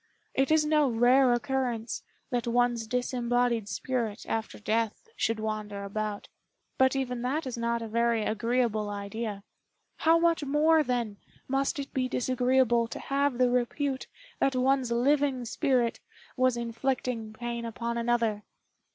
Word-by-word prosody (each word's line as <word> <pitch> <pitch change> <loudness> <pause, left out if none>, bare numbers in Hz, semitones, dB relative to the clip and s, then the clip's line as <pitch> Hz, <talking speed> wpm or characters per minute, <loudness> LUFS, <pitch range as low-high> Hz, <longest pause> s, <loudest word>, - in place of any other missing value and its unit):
It 270 0 +2
is 310 -1 +4
no 300 -2 +3
rare 245 +3 +5
occurrence 240 -2 -1 0.3
that 240 -2 -1
one's 240 -1 +1
disembodied 245 -2 0
spirit, 230 +1 -2
after 225 0 -3
death, 225 - -1
should 225 0 0
wander 215 -2 -4
about; 210 +1 -4 0.5
but 260 +1 +4
even 250 -3 -2
that 275 +6 -1
is 255 -2 -4
not 235 0 -1
a - - -5
very 230 0 +1
agreeable 225 -1 0
idea. 205 0 -4 0.5
How 325 +1 +4
much 335 -2 +2
more, 305 +3 +4
then, 240 -7 -1 0.3
must 270 +2 0
it 280 -1 -5
be 255 -1 0
disagreeable 250 -2 +2
to - - -7
have 280 -2 0
the 250 -1 +3
repute 260 +2 -1 0.3
that 270 -1 +2
one's 260 -1 +2
living 265 +1 +2
spirit 240 0 +1 0.4
was 255 -2 +2
inflicting 235 -1 -2
pain 235 +1 -5
upon 235 +1 -3
another!" 235 -3 +1
240 Hz, 140 wpm, -28 LUFS, 230-265 Hz, 0.5 s, rare